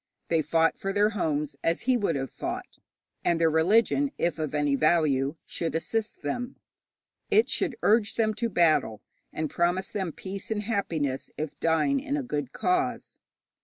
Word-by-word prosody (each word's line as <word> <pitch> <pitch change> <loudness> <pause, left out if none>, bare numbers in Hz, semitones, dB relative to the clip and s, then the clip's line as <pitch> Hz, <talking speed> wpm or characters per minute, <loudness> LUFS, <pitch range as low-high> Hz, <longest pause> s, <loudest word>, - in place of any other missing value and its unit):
They 165 -1 +3
fought 165 +1 +2
for 195 - -2
their 205 +2 +3
homes, 150 -7 -1
as 165 0 +1
he 255 +1 +2
would 205 -9 0
have 135 -1 -3
fought; - - -6 0.4
and 170 -1 +2
their 165 -1 +3
religion, 220 - +3
if 170 -2 0
of 155 -1 -2
any 145 -1 +1
value, 150 -2 +2
should 165 -1 -3
assist 215 +6 -2
them. 245 - -3 0.7
It 435 +2 +4
should 325 -10 -1
urge 215 0 +3
them 215 -1 +2
to 230 +2 -2
battle, 155 - +2 0.3
and 155 - -2
promise 175 +4 0
them 190 -5 -3
peace 190 +4 -7
and 215 -1 -1
happiness 165 - -2
if 155 -1 -5
dying 165 - +2
in 285 +1 -2
a 285 - -2
good 145 - -3
cause. 365 0 -1
175 Hz, 165 wpm, -27 LUFS, 155-220 Hz, 0.7 s, It